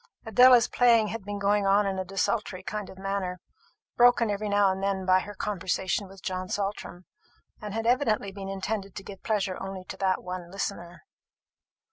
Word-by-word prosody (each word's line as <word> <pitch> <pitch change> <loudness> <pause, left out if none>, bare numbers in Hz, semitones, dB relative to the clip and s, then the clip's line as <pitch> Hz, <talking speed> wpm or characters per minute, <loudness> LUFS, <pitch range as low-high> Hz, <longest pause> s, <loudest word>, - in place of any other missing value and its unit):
Adela's 245 +2 +6
playing 230 -3 +4
had 225 0 -5
been 205 +1 -5
going 200 0 +2
on 200 +1 +4
in 190 -1 -2
a - - -1
desultory 195 0 -2
kind 210 0 -5
of 190 - -12
manner, 190 -2 -3 0.6
broken 240 -2 +5
every 205 +1 -2
now 205 -1 +4
and 190 0 -4
then 195 -1 -1
by 185 0 +5
her 205 +2 -8
conversation 190 0 -2
with 195 -1 -15
John 185 0 -3
Saltram, 195 -3 -4 0.6
and 210 -1 -6
had 225 0 -2
evidently 230 -5 +1
been 195 0 -7
intended 195 0 -4
to 195 - -7
give 195 -1 -10
pleasure 200 -4 -1
only 195 -1 -6
to - - -9
that 190 -1 0
one 180 -1 -6
listener. 175 -2 -5
195 Hz, 180 wpm, -27 LUFS, 190-210 Hz, 0.6 s, Adela's